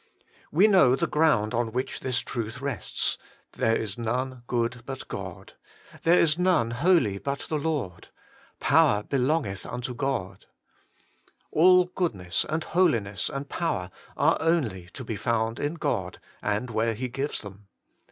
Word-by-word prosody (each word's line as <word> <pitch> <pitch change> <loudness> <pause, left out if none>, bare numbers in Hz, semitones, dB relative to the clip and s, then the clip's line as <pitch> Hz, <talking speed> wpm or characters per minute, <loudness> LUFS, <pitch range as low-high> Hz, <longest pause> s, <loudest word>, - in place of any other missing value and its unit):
We 185 +7 +5
know 165 -12 +6
the 170 - 0
ground 150 -10 +2
on 115 -1 0
which 130 +2 -2
this 125 -2 0
truth 115 0 -5
rests, 135 -4 -2 0.2
' - - -36
There 115 0 +3
is 110 0 -4
none 125 +2 -2
good 120 0 -1
but 135 -1 -6
God - - -7 0.2
'; - - -25
' - - -19
There 170 +2 +6
is 160 0 +3
none 180 -11 +3
holy 120 - +2
but 140 +4 -3
the 155 - -2
Lord 140 - -3 0.2
'; - - -28
' - - -35
Power 105 0 +5
be 140 - -1
longeth 130 - 0
unto 125 +1 -5
God.' 125 -7 -3 1.0
All 180 +3 +6
goodness 100 - -1
and 155 +1 -1
holi 170 -10 +3
ness 100 -1 -3
and 140 +1 -5
power 95 - -2 0.3
are - - +3
only 120 - 0
to - - -7
be 115 -2 -4
found 115 +1 -1
in 145 +3 -2
God, 95 - -2 0.2
and 105 +4 -1
where 110 +1 0
He 125 +4 -3
gives 135 +4 -3
them. 100 -1 -12
125 Hz, 170 wpm, -26 LUFS, 110-155 Hz, 1.0 s, know